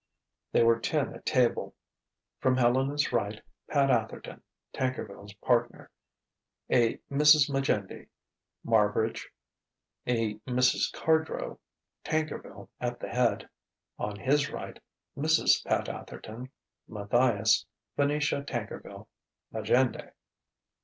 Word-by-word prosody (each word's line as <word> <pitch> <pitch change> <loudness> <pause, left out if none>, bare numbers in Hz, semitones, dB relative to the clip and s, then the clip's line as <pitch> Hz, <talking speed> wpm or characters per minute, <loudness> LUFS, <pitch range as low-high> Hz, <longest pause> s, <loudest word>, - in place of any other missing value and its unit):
They - - +4
were 115 0 +4
ten 140 +5 -1
at - - -11
table: 125 -2 +1 0.6
from 130 -1 +2
Helena's 130 +4 +2
right, 105 +2 -1 0.3
Pat 140 -2 +3
Atherton 115 -3 -2 0.3
(Tankerville's 105 -6 -4
partner), 120 +2 0 0.8
a 120 -2 +3
Mrs. 150 0 +6
Majendie, 135 -8 -1 0.6
Marbridge, 110 0 +1 0.8
a 115 -3 0
Mrs. 125 0 +2
Cardrow, 160 0 0 0.4
Tankerville 155 -1 -3
at - - -3
the - - -6
head; - - +1 0.5
on 105 0 -3
his 140 +7 +1
right, - - -7 0.4
Mrs. - - +3
Pat - - 0
Atherton, 120 +4 -8 0.4
Matthias, 110 0 +2 0.3
Venetia 145 0 +1
Tankerville, 120 -6 -6 0.5
Majendie. 115 +4 +1
125 Hz, 95 wpm, -29 LUFS, 110-140 Hz, 0.8 s, Mrs